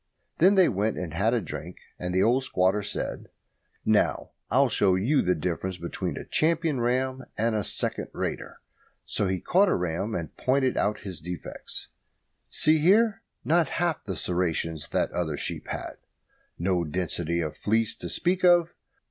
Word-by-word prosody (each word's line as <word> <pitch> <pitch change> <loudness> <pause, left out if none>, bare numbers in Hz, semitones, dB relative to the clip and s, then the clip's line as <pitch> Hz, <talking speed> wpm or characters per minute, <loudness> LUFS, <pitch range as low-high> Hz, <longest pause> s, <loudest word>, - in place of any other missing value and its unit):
Then 190 +5 +6
they 190 -2 +6
went 105 +2 0
and 85 -4 -4
had 110 +8 +2
a - - +2
drink, 85 - -7 0.2
and 90 0 -3
the 95 +1 +3
old 125 +4 +3
squatter 95 -2 +1
said, - - -4 0.6
"Now, - - +2 0.2
I'll 135 +4 +4
show 100 -5 +3
you 125 +10 +2
the 90 0 +2
difference 90 +3 -3
between 85 -1 -4
a - - -6
champion 160 -3 +1
ram 130 +2 0
and 115 +1 +1
a 105 -1 0
second - - -1
rater." - - -4 0.4
So 105 - 0
he 95 0 -1
caught 195 - +3
a - - +2
ram 90 +5 -2
and 80 -3 -5
pointed 130 0 +1
out 105 0 0
his 95 -5 -6
defects. 85 -1 -7 0.6
"See 155 0 +4
here 205 +6 +4 0.2
not 165 +1 +3
half 170 -2 0
the 95 - -4
serrations 80 -3 -1
that - - 0
other 80 -4 -2
sheep - - -4
had. - - -5 0.6
No 90 0 +1
density 85 +1 -2
of 80 -3 -3
fleece 110 +1 0
to - - -6
speak 180 +1 0
of. 175 -2 +5
105 Hz, 165 wpm, -27 LUFS, 90-140 Hz, 0.6 s, Then